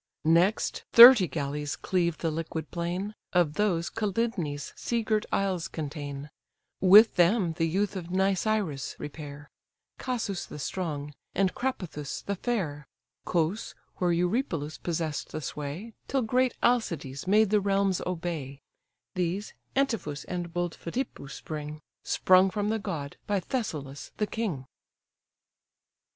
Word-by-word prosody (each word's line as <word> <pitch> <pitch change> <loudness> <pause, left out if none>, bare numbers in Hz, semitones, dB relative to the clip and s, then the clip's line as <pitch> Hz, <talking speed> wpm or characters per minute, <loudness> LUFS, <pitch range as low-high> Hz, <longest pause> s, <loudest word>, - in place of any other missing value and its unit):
Next 170 +6 +2
thirty 235 -5 +11
galleys 145 -1 -3
cleave 170 -3 0
the 165 - -1
liquid 160 0 -4
plain, 180 +4 -3 0.2
Of 175 -4 +3
those 175 -3 0
Calydnæ's 200 -9 -2
sea 235 -1 -1
girt 215 -1 0
isles 190 -4 0
contain; 145 -2 -6 0.5
With 205 +4 +7
them 175 0 +3
the 165 0 0
youth 195 +5 0
of 180 -3 -5
Nisyrus 190 -5 0
repair, 145 -1 -8 0.5
Casus 225 -7 -3
the - - -8
strong, 150 -2 -4 0.2
and 195 -2 +2
Crapathus 180 - -4
the 200 - -1
fair; 175 - -2 0.4
Cos, 175 +5 -1 0.2
where 180 -1 +1
Eurypylus 170 - -1
possess'd 160 -3 -3
the 155 - -2
sway, 150 +9 -6
Till 270 -1 0
great 250 +2 +1
Alcides 170 - 0
made 210 +1 +4
the 210 -1 +4
realms 195 -1 +1
obey: 165 -6 -4 0.5
These 185 +2 -2 0.2
Antiphus 220 - 0
and 175 -2 -4
bold 175 0 -2
Phidippus 170 - -5
bring, 150 -1 -5 0.2
Sprung 185 +1 +4
from 205 +1 -1
the 220 0 0
god 160 -9 -5
by 205 -1 +1
Thessalus 155 - -4
the 210 - +1
king. 205 - -3
175 Hz, 125 wpm, -28 LUFS, 155-210 Hz, 0.5 s, thirty